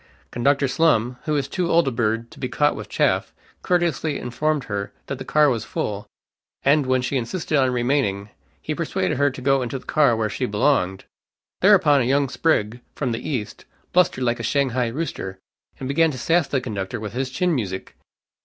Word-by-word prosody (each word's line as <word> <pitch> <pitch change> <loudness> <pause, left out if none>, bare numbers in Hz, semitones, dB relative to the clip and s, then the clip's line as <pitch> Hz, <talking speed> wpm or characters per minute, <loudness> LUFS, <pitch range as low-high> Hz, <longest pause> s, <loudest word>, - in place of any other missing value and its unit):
Conductor 140 +3 +2
Slum, 125 -5 +2
who 155 - 0
is 140 -2 0
too 180 -2 -2
old 170 -3 +4
a - - +1
bird 115 0 -1
to - - -14
be 125 - -3
caught 145 +3 +2
with - - -8
chaff, - - +1 0.3
courteously 170 -4 0
informed 145 +4 -1
her 100 -3 -4
that - - -5
the - - -5
car 150 0 +3
was 120 -6 0
full, 105 -1 -4 0.6
and 140 0 +3
when 130 -1 +2
she 135 +2 -1
insisted 150 +6 -2
on 130 -2 +4
remaining, 120 -5 0 0.3
he - - -4
persuaded 95 +5 -1
her 145 0 +4
to 130 -1 -9
go 135 0 +3
into 125 +1 -3
the 125 - -13
car 145 -6 +3
where 110 -1 0
she 125 +4 -2
belonged. 105 -4 +1 0.5
Thereupon 180 -8 +5
a - - +1
young 140 +1 +2
sprig, 120 -6 0
from 135 -4 -2
the 115 - -4
East, 120 -8 -4 0.3
blustered 175 -7 +3
like 120 -1 0
a 115 0 -1
Shanghai 130 -4 +1
rooster, 115 - -4 0.4
and 130 - -4
began 160 +4 +3
to 135 - -5
sass 165 +5 +2
the 135 - 0
conductor 105 -2 -4
with 105 -1 -6
his 130 +1 -2
chin 175 +6 0
music. 95 -9 -4
130 Hz, 195 wpm, -23 LUFS, 115-150 Hz, 0.6 s, Thereupon